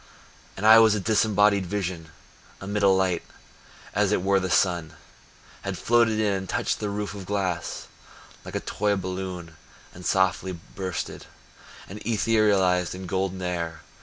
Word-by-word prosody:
And 100 - -3
I 110 +1 +9
was 110 -2 +5
disembodied 105 -2 +2
vision 90 -4 -4 0.5
Amid 100 +2 -3
a 100 - +5
light, 95 -3 +2 0.7
as 105 -1 +2
it 95 - +1
were 100 0 +3
the 95 -1 -3
sun 85 -4 +1 0.7
Had - - -4
floated 115 -2 +3
in 105 -2 +2
and 95 -1 -4
touched - - -1
the 105 - -2
roof 105 0 -3
of 100 -3 -8
glass 95 -4 -2 0.6
Like - - -8
a - - -1
toy 105 0 0
balloon 90 -3 -5 0.4
and 90 - -11
softly 95 0 +1
bursted, 90 +1 -6 0.6
And 100 +3 -8
etherealized 105 -5 +2
in 95 +1 -7
golden 95 +1 -2
air. 85 -3 -3
95 Hz, 145 wpm, -25 LUFS, 90-105 Hz, 0.7 s, I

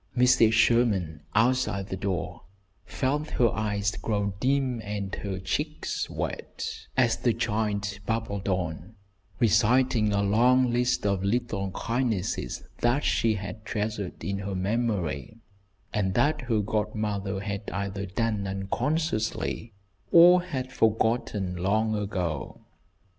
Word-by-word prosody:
Mrs. 120 -3 +5
Sherman, 110 - +2
outside 110 -4 +2
the - - -2
door, 95 -5 -3 0.4
felt 145 +3 -1
her 120 -2 +5
eyes 105 -2 -1
grow 100 -2 -2
dim 130 -2 +1
and 100 -1 -4
her 100 -2 -4
cheeks 95 - -3
wet, - - -5
as 120 -3 +3
the 120 - +1
child 105 -3 -1
babbled 110 -3 -2
on, 90 +2 -3 0.4
reciting 115 -1 +3
a 100 0 +1
long 125 +5 +4
list 125 -2 +1
of 100 -2 +1
little 105 -2 -1
kindnesses 115 - -2 0.2
that 120 +4 +2
she 110 -2 +2
had 105 +2 -6
treasured 105 -4 -3
in 100 0 -2
her 100 -1 -4
memory, 100 - -1 0.6
and 95 -3 0
that 150 0 +2
her 110 -2 +3
godmother 105 -2 -2
had 100 +1 -4
either 100 0 -3
done 105 0 -1
unconsciously, 110 - -1 0.4
or 175 +1 +8
had 130 -7 -4
forgotten 110 -4 +1
long 110 +5 +1
ago. 95 -6 -3
105 Hz, 120 wpm, -27 LUFS, 100-120 Hz, 0.6 s, or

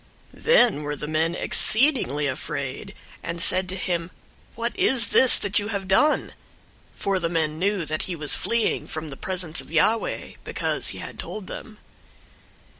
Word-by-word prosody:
001:010 - - -18
Then 245 - +4
were 145 0 -3
the 150 +1 -6
men 160 +2 0
exceedingly 220 - +4
afraid, 140 +6 -5 0.3
and 170 0 -5
said 185 +2 +3
to 185 - -3
him, 175 -2 -2 0.5
"What 235 +1 -3
is 250 -3 +2
this 260 - +5
that 200 0 0
you 205 - -4
have 200 -3 -4
done?" 295 +11 +2 0.6
For 195 -1 -1
the 170 -2 -2
men 160 -2 -1
knew 195 -2 0
that 155 +1 -3
he 180 - -3
was 150 -3 -3
fleeing 230 -1 0
from 155 -1 -6
the - - -7
presence 175 -1 -4
of - - -16
Yahweh, 215 +8 0
because - - -1
he - - +1
had - - -9
told 215 -3 -6
them. 215 +3 -9
185 Hz, 170 wpm, -24 LUFS, 155-215 Hz, 0.6 s, this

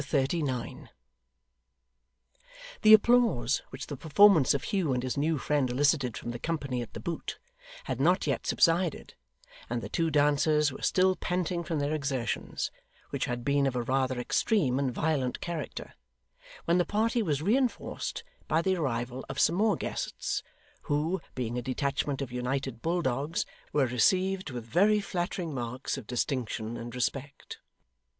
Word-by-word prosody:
Chapter 145 - -1
39 135 -3 -2 1.9
The 215 0 +8
applause 215 - +3
which - - -7
the 145 - -6
performance 160 0 +5
of 140 - -2
Hugh 185 -10 0
and 125 0 -1
his 130 - -2
new 155 +2 +1
friend 145 -2 0
elicited 130 -1 +1
from 120 - -5
the 120 - -6
company 140 -6 -2
at 120 - -8
The - - -6
Boot, 170 -1 -4 0.5
had - - -3
not - - +3
yet - - -1
subsided, 170 -2 +2 0.6
and 120 0 -1
the - - -7
two 165 -1 0
dancers 150 0 +3
were 130 - -9
still 185 0 +3
panting 180 -1 -2
from 160 -1 -2
their 145 +1 0
exertions, 140 -6 -2 0.4
which - - -1
had 120 -1 -4
been 140 0 +2
of 130 - -2
a 120 - 0
rather 130 0 0
extreme 135 - +1
and 135 -2 0
violent 135 -2 -1
character, 170 -4 -5 0.7
when 170 +2 +3
the - - +4
party 225 +5 +1
was 150 -7 -1
reinforced 245 +6 -1 0.2
by 160 +2 +2
the 190 0 +1
arrival 125 -4 -2
of - - -4
some 170 - +4
more 215 0 +3
guests, - - -3 0.5
who, 160 +5 0
being 125 -1 -2
a - - -4
detachment 140 +2 -1
of 130 - -7
United 125 0 -3
Bulldogs, 160 -3 -1 0.3
were 145 -2 +3
received 185 - +2
with 120 -3 -6
very 200 - +3
flattering 175 -4 -3
marks 125 0 -3
of 135 -6 -8
distinction 120 -3 -2
and 120 0 -7
respect. 135 +3 -4
145 Hz, 155 wpm, -29 LUFS, 125-170 Hz, 1.9 s, The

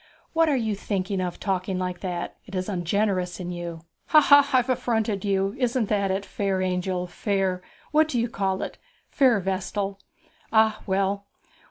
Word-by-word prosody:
'What 325 -1 +4
are 280 - +2
you 220 -3 0
thinking 195 -1 -2
of, 180 -1 -3
talking 190 -1 -1
like 180 -1 -3
that? 175 -2 -4
It 195 - -8
is 185 0 -2
ungenerous 185 -1 0
in 180 -1 -4
you.' 170 -2 -6 0.3
'Ha, 310 - +7
ha! 285 -1 +6
I've 255 -1 +3
affronted 220 -5 0
you. 195 -1 +1
Isn't 245 -3 +1
that 200 -2 +1
it, 195 +1 -1
fair 195 -2 -1
angel, 180 0 -1
fair 190 0 -1 0.3
what 310 +1 +4
do 255 -6 -1
you 235 - +1
call 195 -4 -1
it? - - -7 0.3
fair 255 -6 +4
vestal? 195 +1 -2 0.5
Ah, 220 -1 +3
well! 195 +1 0
195 Hz, 170 wpm, -25 LUFS, 185-220 Hz, 0.5 s, Ha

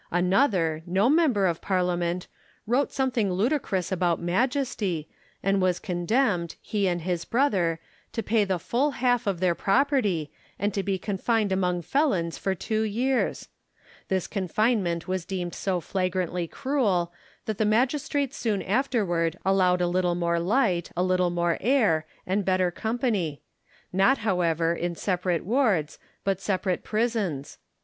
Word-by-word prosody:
Another, 180 - +2
no 195 +8 +3
member 290 - +3
of 170 -3 0
Parliament, 180 -2 0 0.4
wrote 250 +6 +1
some 265 -1 0
thing 215 -6 0
ludicrous 195 - 0
about 175 -2 +1
Majesty, 195 - -1 0.4
and 195 0 +2
was 180 -1 +2
condemned, 180 -1 0
he 205 -3 -1
and 175 -1 0
his 175 -1 -1
brother, 190 - +1 0.3
to 225 - -3
pay 220 -1 +2
the 190 -2 0
full 270 - 0
half 245 -3 +1
of 190 -4 0
their 180 -1 +2
property, 205 - +1 0.3
and 205 +1 -1
to 195 - 0
be 195 0 -1
confined 205 +2 0
among 180 -2 0
felons 185 - +1
for 190 -1 -1
two 215 +4 -1
years! 240 +5 0 0.6
This 190 -2 0
confinement 195 -3 0
was 185 -1 -1
deemed 175 -1 -4
so 190 -2 -1
fl'agrantly 180 -1 -2
cruel, 200 -11 0 0.3
that 215 -2 -3
the - - +3
magistrates 265 +5 +1
soon 215 -7 -1
afterward 190 - 0
allowed 185 -2 +3
a 175 - +2
little 175 0 +1
more 170 -1 0
light, 185 -2 +1
a 180 - +2
little 185 -1 +2
more 170 -1 0
air, 210 - +2 0.2
and 195 +2 0
better 185 -1 +2
company; 220 - -2 0.5
not, 195 +9 +4
however, 170 -5 +1
in 170 0 -3
separate 180 -2 -1
wards, 210 - +1 0.2
but 195 -1 -1
separate 190 -2 -1
prisons. 215 - -2
190 Hz, 145 wpm, -26 LUFS, 175-225 Hz, 0.6 s, not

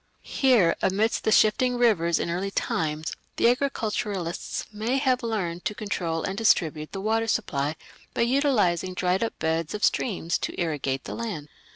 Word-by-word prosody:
Here, 240 -11 +3
amidst 210 +4 +1
the 220 - +3
shifting 245 +4 +4
rivers 185 -9 +3
in 170 - -2
early 185 +3 -2
times, 155 -4 -2 0.2
the - - +3
agriculturists 215 -8 -1
may 225 +5 -1
have 260 -2 +2
learned 190 -7 -2
to 210 - -1
control 175 -6 -2
and 190 - -2
distribute 160 -8 +1
the 195 - -5
water 225 +2 +1
supply 155 -10 -1 0.4
by - - 0
utilizing 235 - +2
dried 185 +3 +1
up 230 - -3
beds 160 +2 -1
of 210 - +2
streams 175 -7 0
to - - -4
irrigate 145 -6 -1
the - - -6
land. 200 -11 -5
195 Hz, 160 wpm, -26 LUFS, 165-230 Hz, 0.4 s, shifting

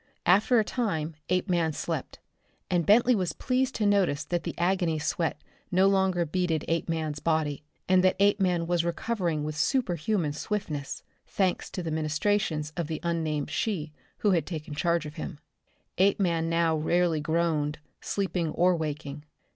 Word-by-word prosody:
After 205 +7 +5
a - - +3
time 165 -10 -2 0.2
Apeman 175 -3 +1
slept, - - -4 0.5
and 175 -2 +1
Bentley 235 +4 +6
was 185 -6 0
pleased 260 0 0
to 215 - 0
notice 190 -8 +2
that 175 -1 -2
the - - -4
agony 175 -2 +1
sweat 155 0 -1 0.3
no 185 +1 +4
longer 190 -3 +2
beaded 165 -1 -1
Apeman's 160 -2 -1
body, 155 -3 0 0.2
and 185 0 +4
that 185 - +4
Apeman 190 -4 +3
was 175 0 +1
recovering 170 -3 -1
with 155 0 -3
superhuman 175 - 0
swiftness 150 -5 -4 0.2
thanks 190 -3 0
to 180 - -5
the 165 - -3
ministrations 155 0 0
of 170 -3 -2
the 160 -1 -3
unnamed 160 -4 -1
she 165 -9 -2 0.3
who 205 - +2
had 170 -3 +1
taken 160 -3 -5
charge 170 +1 0
of 150 +3 -8
him. 160 0 -5 0.6
Apeman 180 -4 +2
now 165 -1 +2
rarely 165 +1 +1
groaned, 155 -1 0 0.2
sleeping 180 -4 -1
or 180 +1 +3
waking. 150 -2 -4
170 Hz, 150 wpm, -28 LUFS, 155-190 Hz, 0.6 s, Bentley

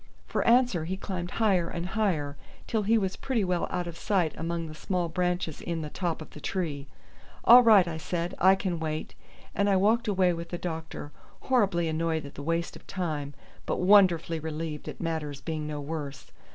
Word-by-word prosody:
For - - -1
answer 235 -9 +4
he 190 +3 -3
climbed 180 -3 -4
higher 190 -7 +2
and 170 0 -4
higher 175 -10 0 0.3
till 220 - 0
he 220 +3 +3
was 190 -3 -1
pretty 245 -6 -1
well 180 -2 0
out 180 -1 -2
of 170 -1 -7
sight 185 -7 +1
among 165 0 -3
the 155 - -8
small 175 +2 -2
branches 180 -2 -1
in 165 -2 -3
the 150 - -6
top 170 -4 -2
of - - -16
the 150 - -11
tree. 150 -7 -3 0.6
"All 245 +2 +10
right!" 215 -6 +6
I 160 -1 -3
said, 170 +3 -3
"I 190 +2 +6
can 185 -3 -2
wait;" 155 -1 -3 0.4
and 200 0 +1
I 195 - +4
walked 220 +5 +3
away 185 -3 +3
with 170 0 -6
the 175 - -3
doctor, 160 -4 -5 0.3
horribly 200 -10 +2
annoyed 160 -1 -1
at 140 - -9
the - - -8
waste 165 +3 -1
of - - -14
time, 150 -6 -3 0.3
but - - -1
wonderfully 180 -4 +5
relieved 155 -1 -5
at - - -8
matters 155 -4 -3
being 155 -2 -4
no 150 -1 -4
worse. 145 -1 -6
170 Hz, 195 wpm, -28 LUFS, 160-190 Hz, 0.6 s, All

